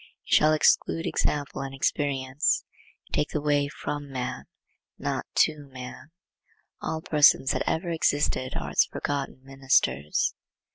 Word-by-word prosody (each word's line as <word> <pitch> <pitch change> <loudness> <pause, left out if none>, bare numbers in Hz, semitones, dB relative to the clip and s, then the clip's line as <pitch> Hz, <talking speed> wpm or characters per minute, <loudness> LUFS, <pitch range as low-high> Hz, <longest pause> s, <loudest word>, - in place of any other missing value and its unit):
It - - -2
shall 155 - +6
exclude 155 +1 +3
example 145 -2 -1
and 135 0 -6
experience. 135 0 0 0.4
You - - -26
take 150 - +1
the 150 - -2
way 145 -1 +1
from 145 0 -5
man, 125 0 -4 0.5
not - - -3 0.2
to 145 -2 -3
man. 130 +2 -9 0.7
All 160 0 -3
persons 145 -3 +5
that - - -1
ever 170 +1 -1
existed 145 -5 0
are - - -5
its - - +4
forgotten 140 -2 -4
ministers. 130 - +1
140 Hz, 135 wpm, -26 LUFS, 130-150 Hz, 0.7 s, shall